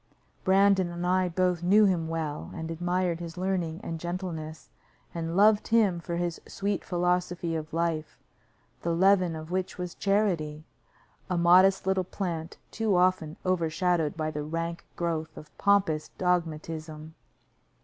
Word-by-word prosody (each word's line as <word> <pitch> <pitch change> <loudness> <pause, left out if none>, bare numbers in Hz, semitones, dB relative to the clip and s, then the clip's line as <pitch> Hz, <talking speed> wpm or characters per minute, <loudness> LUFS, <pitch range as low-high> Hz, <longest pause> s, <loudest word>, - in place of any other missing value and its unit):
Brandon 190 -1 +4
and 175 0 -4
I 185 0 +2
both 180 0 +1
knew 205 +5 +5
him 175 -5 +1
well, 160 -2 -3
and 160 -1 -5
admired 175 +1 -1
his 170 0 -7
learning 180 -2 -2
and 165 -1 -4
gentleness, 170 -3 -5 0.4
and 165 +1 -3
loved 210 +1 +5
him 215 -6 +3
for 170 0 -4
his 175 -1 -2
sweet 200 0 -2
philosophy 180 -1 -1
of 155 -1 -5
life, 165 -1 -2 0.6
the 170 0 0
leaven 185 -2 +4
of 155 +1 -8
which 185 +1 -2
was 180 -1 -5
charity 175 -7 0 0.7
a 180 - 0
modest 185 +3 +5
little 190 -1 +1
plant 170 -3 -4
too 220 -3 0
often 180 -4 +1
overshadowed 170 -2 +1
by 155 -1 -1
the 150 -1 -4
rank 165 +2 -4
growth 160 -2 -3
of 150 - -12
pompous 195 -7 +2
dogmatism. 160 -3 -2
175 Hz, 140 wpm, -28 LUFS, 160-185 Hz, 0.7 s, knew